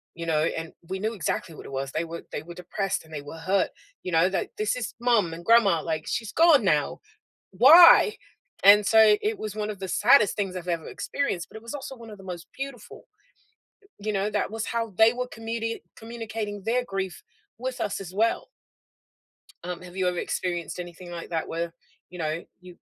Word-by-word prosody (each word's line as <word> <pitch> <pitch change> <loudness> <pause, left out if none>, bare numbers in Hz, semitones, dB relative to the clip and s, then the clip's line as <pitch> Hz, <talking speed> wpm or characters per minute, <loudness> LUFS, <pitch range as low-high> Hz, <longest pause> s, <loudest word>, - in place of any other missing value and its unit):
you 170 0 -6
know, 155 -1 +2
and 160 0 -3 0.2
we 190 0 -3
knew 220 +3 -1
exactly 170 -4 -3
what - - -11
it - - -9
was. 135 0 -3
They 160 - -1
were 170 0 -7
they 145 - -4
were 175 +2 -10
depressed, 190 +3 -3
and 160 - -19
they 145 -2 -5
were 145 +3 -9
hurt, 185 +4 +1 0.3
you 180 - -4
know? 165 +3 +4
That 190 - -2
"This 215 +2 0
is 235 -4 -4
mom 230 -9 +2
and 170 - -8
grandma," 205 -8 +5
like, 160 -1 -3
"She's 225 -3 -3
gone 325 -6 +5
now, 150 -6 +1 0.5
why?" 345 +5 +8 0.5
And 205 +1 +8
so 220 -1 +6
it 425 0 -1
was 215 -1 -5
one 215 0 -3
of 205 - -9
the 190 - -5
saddest 215 +2 +5
things 195 -3 -2
I've 180 -1 -6
ever 165 -2 -2
experienced, 235 -12 -3
but - - -10
it 220 - -12
was 230 - -7
also 270 -1 -6
one 230 -1 -11
of 210 - -10
the 195 - -14
most 175 -2 -7
beautiful, 255 -6 -8 0.9
you 215 +1 -2
know? 200 +1 0
That 210 0 -1
was 225 0 -3
how 230 -3 -2
they 220 +1 +7
were 250 0 -3
communi 225 0 -4 0.2
communicating 220 -3 -6
their 245 +3 0
grief 195 -3 -4 0.4
with 255 -1 -4
us 205 - -2
as 185 -2 -9
well. 225 +4 +1 1.2
Um, 180 0 -5
have 180 0 -12
you 185 -1 0
ever 180 - -4
experienced 175 -1 -3
anything 175 0 -8
like 170 -1 -7
that 165 -2 -2
where, 170 0 -3 0.4
you 180 -1 -10
know? 155 +1 -2 0.2
You 180 -1 -13
195 Hz, 205 wpm, -26 LUFS, 170-225 Hz, 1.2 s, why